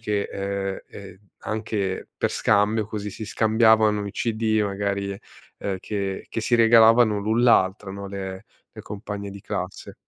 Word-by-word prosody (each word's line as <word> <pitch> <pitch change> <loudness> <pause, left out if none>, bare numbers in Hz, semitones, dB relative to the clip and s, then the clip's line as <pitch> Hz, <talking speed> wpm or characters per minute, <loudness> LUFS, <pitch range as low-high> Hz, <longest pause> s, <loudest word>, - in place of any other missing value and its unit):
che 105 -2 -1
ehm, 100 0 -3
e 95 -2 -11 0.3
anche 105 -3 -3
per - - 0
scambio 105 +1 +2
così, 105 -2 -5
si 110 - -7
scambiavano 110 -1 +3
i 100 - -5
CD 110 -1 0
magari, 100 0 -2 0.4
ehm, 100 -1 -3
che 95 0 -4
che - - -3
si 120 +2 +2
regalavano 115 -1 +6
l'un 110 +3 +1
l'altra, 95 -3 +3
no, 100 0 -7
le 95 +1 -6 0.3
le - - -8
compagne 100 -1 -6
di 100 - -10
classe. 95 -2 -5
105 Hz, 150 wpm, -24 LUFS, 100-110 Hz, 0.4 s, regalavano